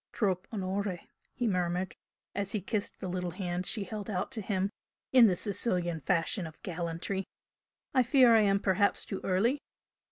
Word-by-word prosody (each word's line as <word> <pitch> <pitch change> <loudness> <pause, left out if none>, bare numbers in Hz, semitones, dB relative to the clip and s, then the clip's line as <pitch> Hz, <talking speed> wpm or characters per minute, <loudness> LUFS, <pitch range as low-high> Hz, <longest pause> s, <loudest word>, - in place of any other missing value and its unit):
"Tropp' 190 -4 0
onore!" 195 -2 -2 0.4
he 245 - -1
murmured, 180 -2 0 0.4
as 200 -1 -3
he 215 - +1
kissed 205 +2 -3
the 190 - -4
little 180 0 -2
hand 180 0 -3
she 215 - +1
held 210 +2 -6
out 185 +2 -2
to 230 -4 -2
him 195 -1 -1 0.4
in 250 -3 +8
the 185 - +2
Sicilian 180 -4 -1
fashion 180 - +1
of 160 - -13
gallantry 175 +2 -3 0.7
"I 260 - +5
fear 255 -1 +6
I 225 - +7
am 200 -1 +3
perhaps 200 +1 +2
too 195 - -5
early?" 220 +10 +2
195 Hz, 165 wpm, -31 LUFS, 180-215 Hz, 0.7 s, in